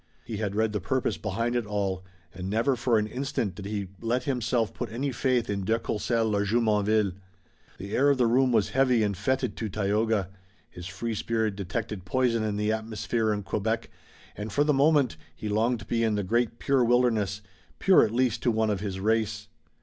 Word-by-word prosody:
He 110 -2 -5
had 100 -2 -2
read 110 0 +1
the 105 - -1
purpose 125 0 0
behind 115 +3 -1
it 120 -3 -1
all, 100 -3 -2 0.3
and 95 +1 -5
never 115 +6 +2
for 120 -1 +2
an 105 - +1
instant 125 -3 -2
did 100 -2 -9
he 100 -2 -3
let 120 +2 0
himself 120 -4 0
put - - -5
any 135 +5 -2
faith 125 -1 +1
in 100 -1 -2
de 110 +4 +2
Courcelles 115 0 -1
or 100 0 +2
Jumonville. 105 -1 +2 0.7
The 100 +2 -5
air 140 +2 +4
of 140 - +3
the 125 - +3
room 125 +2 +3
was 110 -4 +2
heavy 125 -4 +3
and 100 -1 0
fetid 125 +6 -1
to 110 - -3
Tayoga. 105 0 0 0.4
His 90 0 -8
free 115 +4 -4
spirit 110 -1 -1
detected 100 0 -4
poison 120 +3 +1
in 105 -1 -1
the 105 +1 +1
atmosphere 110 0 -1
of 105 -2 -3
Quebec, 110 +3 -2 0.4
and, 105 +1 -5
for 145 - +3
the 150 0 +2
moment, 140 - +3 0.2
he 105 - -6
longed 110 +3 +1
to - - -9
be 115 -1 0
in 110 -2 +2
the 105 - -1
great, 115 +4 0
pure 135 -1 +2
wilderness, 115 -5 +2 0.4
pure 190 - +5
at - - +1
least 120 0 0
to - - +2
one 110 -1 +1
of 100 - -1
his 95 -2 -4
race. 105 0 0
110 Hz, 205 wpm, -27 LUFS, 105-120 Hz, 0.7 s, pure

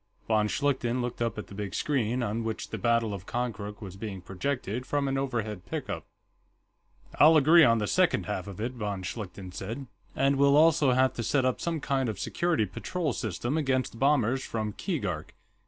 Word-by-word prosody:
Von 110 -1 +3
Schlichten 130 -1 0
looked 120 -1 -3
up 115 -2 -1
at 105 - -5
the - - -13
big 100 -2 -5
screen, 125 -4 0
on 115 +1 -2
which 110 -1 -4
the - - -4
battle 115 -2 +2
of 95 -2 -7
Konkrook 105 -4 -4
was 95 -2 -8
being 100 -1 -6
projected 115 +5 -3
from 140 +1 -1
an 135 - 0
overhead 115 -8 -2
pickup. - - -4 1.1
"I'll 155 +2 +8
agree 160 +3 +7
on 115 -4 +5
the 105 - 0
second - - +2
half - - -3
of 100 -1 -8
it," 115 +3 -2
von 105 -6 -4
Schlichten 95 -1 -6
said. 115 +10 -5 0.3
"And 135 +1 +2
we'll 140 +1 +5
also 155 -4 +5
have 130 +1 +3
to 120 - -1
set 130 +3 +2
up 130 - 0
some 165 -2 -1
kind 135 -3 0
of 105 - -4
security 170 -10 0
patrol 155 - -3
system 120 - -2
against 130 -5 -1
bombers 135 -2 +2
from 110 -2 -3
Keegark. - - -3
120 Hz, 190 wpm, -28 LUFS, 105-135 Hz, 1.1 s, I'll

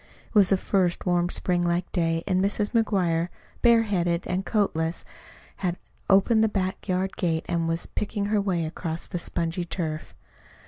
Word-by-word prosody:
It - - -24
was 200 -4 +5
the 195 - +4
first 185 -2 0
warm 175 -1 +2
spring 180 -1 +1
like 175 +1 0
day, 165 -2 0
and 185 -1 +1
Mrs. 205 +1 0
McGuire, 180 -7 +1 0.3
bareheaded 205 -8 +3
and 185 +1 -1
coatless, 170 -6 0 0.5
had 180 -2 -2 0.3
opened 220 +3 +5
the 220 - +3
back 190 -2 -2
yard 185 +1 0
gate 165 -3 0
and 170 -1 0
was 165 0 -1
picking 205 -1 -3
her 210 0 +1
way 180 -5 0
across 160 +1 -4
the 175 - -4
spongy 170 +1 -2
turf. 160 -3 -4
180 Hz, 165 wpm, -26 LUFS, 170-200 Hz, 0.5 s, was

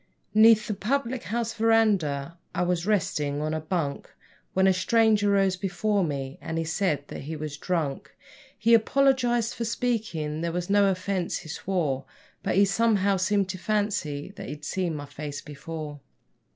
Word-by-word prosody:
'Neath 220 0 +6
the 215 - -2
public 240 +2 -1
house 225 +3 -2
verandah 200 -10 +2 0.2
I - - +1
was 175 0 0
resting 150 -8 0
on 155 +1 -1
a 155 - -1
bunk 155 -3 -2 0.4
When 190 0 +3
a 190 - +5
stranger 210 +2 +3
rose 195 -2 +3
before 195 +2 0
me, 140 -4 -4
and 160 - -4
he 165 - 0
said 160 -3 0
that - - -6
he 155 +4 -5
was 150 -1 -5
drunk; 150 -4 -3 0.4
He 230 +2 +3
apologised 240 -1 +3
for 235 - -3
speaking; 215 -10 -2
there 170 0 -1
was 180 +2 -3
no 200 -1 +5
offence, 185 -1 -1
he 160 - -10
swore; 150 -6 -1 0.4
But - - -1
he 200 +1 +6
somehow 200 -1 +2
seemed 195 +1 +1
to 185 - -4
fancy 195 -7 -1
that 200 - -7
he'd 150 0 -7
seen 175 -1 -1
my 145 -1 -5
face 145 0 -6
before. 150 0 -7
185 Hz, 165 wpm, -26 LUFS, 155-215 Hz, 0.4 s, Neath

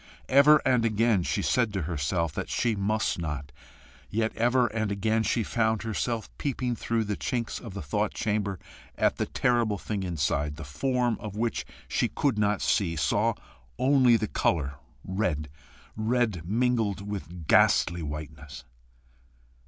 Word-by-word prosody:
Ever 140 +3 +6
and 125 -3 +3
again 110 -2 +2
she - - -1
said 120 -4 +2
to 95 -4 -1
herself 80 +1 -1
that - - -4
she 115 -3 +1
must 105 0 0
not, 75 -4 -4 0.6
yet 110 +1 -1
ever 120 +2 +3
and 110 -2 -1
again 110 +3 +1
she 110 +2 +1
found 110 -1 0
herself 115 +1 -3
peeping 125 -3 -1
through 115 0 -1
the 105 -1 -2
chinks 120 -2 -3
of 110 -6 -9
the 100 - -5
thought 70 - -1
chamber 105 -2 -1 0.4
at - - +2
the - - -1
terrible 120 -4 +1
thing 100 +1 -4
inside 75 -4 -1
the 80 - -8
form 120 - 0
of 105 -2 -7
which 115 +2 -2 0.2
she - - +1
could 135 -7 0
not 105 -2 +1
see 85 -5 +1
saw 105 - +1 0.4
only 130 -2 +5
the 110 0 -2
colour 75 -8 0 0.2
red, 90 -6 -2 0.5
red 110 -4 0
mingled 110 -2 0
with 90 -4 -6
ghastly 85 +3 +4
whiteness. 75 -1 -7
105 Hz, 150 wpm, -27 LUFS, 85-115 Hz, 0.6 s, Ever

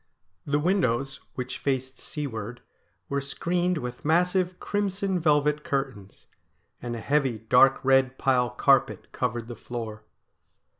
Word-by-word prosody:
The 145 0 +2
windows, 145 -6 +1 0.2
which 125 0 -4
faced 130 -1 -2
seaward, 120 -6 -5 0.5
were 140 0 -1
screened 175 +5 -1
with 125 -4 -6
massive 180 +3 +2
crimson 195 -2 -1
velvet 150 -2 +2
curtains, 130 -9 -4 0.6
and 120 -1 -4
a - - -5
heavy 135 -2 +1
dark 125 +5 +5
red 135 -1 +4
pile 125 -2 +2
carpet 135 +2 +2
covered 120 -2 -2
the 120 - -7
floor. 110 -2 -6
135 Hz, 120 wpm, -26 LUFS, 125-155 Hz, 0.6 s, dark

